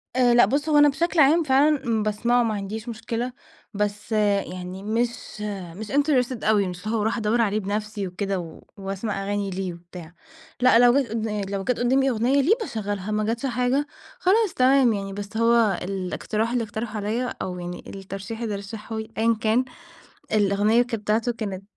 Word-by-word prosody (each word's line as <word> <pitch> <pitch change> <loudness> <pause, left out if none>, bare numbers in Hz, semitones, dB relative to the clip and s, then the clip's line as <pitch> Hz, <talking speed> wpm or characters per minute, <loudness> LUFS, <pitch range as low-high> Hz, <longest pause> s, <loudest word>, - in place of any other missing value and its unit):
آآ 245 -2 +4
لأ 240 - +7
بُص 290 +4 -1
هو 300 - +4
أنا 290 0 +7
بشكل 335 +4 0
عام 310 +4 +5
فعلًا، 285 +1 +3
امم، 225 -2 +1
باسمعه 235 +3 +2
ما 220 -2 0
عنديش 210 +3 -5
مشكلة، 235 +2 -4 0.4
بس 205 +2 -3
يعني 195 -3 -1
مش 230 0 -2 0.3
مش 215 +2 -7
interested 270 -4 +1
أوي 210 -2 +3
مش 180 +2 -7
اللي 225 +1 0
هو - - 0
أروح 220 +3 0
أدوّر 225 +1 +1
عليه 215 -1 +1
بنفسي 210 0 -3
وكده 195 +1 -2
و 165 -2 -9 0.2
وأسمع 195 +1 -4
أغاني 200 0 -2
ليه 185 -1 -3
وبتاع. 170 0 -12 0.5
لأ، 250 -2 +6
لو 245 0 +6
جت 250 - -6
قدّا 220 -2 -2
لو 195 -1 -2
جت 250 +3 -1
قدّامي 265 +2 +3
أغنية 250 +4 +2
ليه 360 - +4
باشغلها، 205 - -3
ما 215 0 0
جتش 230 +5 -2
حاجة 255 +3 0 0.3
خلاص 405 +2 +3
تمام 255 -2 +4
يعني. 195 -1 -4
بس 205 +2 -6
هو 230 -2 +3
الإقتراح 195 +4 -2
اللي 245 -1 0
اقترحه 220 +1 -5
عليَّ، 225 +4 -2
أو 180 -1 -4
يعني 175 0 -6
الترشيح 195 +4 -7
اللي 215 -3 -2
رشّحه 210 +2 -7
لي 220 0 -6
أيًا 230 +1 +3
كان، 230 +4 +2 0.7
الأغنية 210 +3 +3
كانت 235 -3 -3
بتاعته 220 +3 +1
كانت 200 -5 -5
220 Hz, 180 wpm, -24 LUFS, 200-245 Hz, 0.7 s, لأ